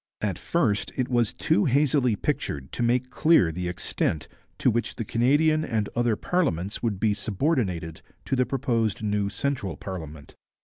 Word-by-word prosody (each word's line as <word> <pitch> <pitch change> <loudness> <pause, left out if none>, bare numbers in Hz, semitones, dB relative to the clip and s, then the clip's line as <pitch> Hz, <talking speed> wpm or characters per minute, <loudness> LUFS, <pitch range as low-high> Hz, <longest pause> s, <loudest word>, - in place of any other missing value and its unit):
At 100 -5 -2
first 110 -12 0
it 130 -2 0
was 120 -3 +2
too 105 - +2
hazily 135 -3 +3
pictured 70 -8 -3
to - - -3
make 125 +2 +1
clear 155 - +4
the 90 +2 -4
extent 90 -3 -2 0.3
to - - +3
which 120 +2 -1
the 115 - -4
Canadian 145 +8 +3
and 110 -7 -1
other 120 -1 +2
parliaments 105 - -1
would 110 -5 -1
be 105 0 +2
subordinated 100 - -1 0.2
to - - 0
the 125 -2 +1
proposed 115 -6 0
new 105 -1 0
central 105 -4 -2
parliament. 80 -6 -8
115 Hz, 160 wpm, -26 LUFS, 95-130 Hz, 0.3 s, clear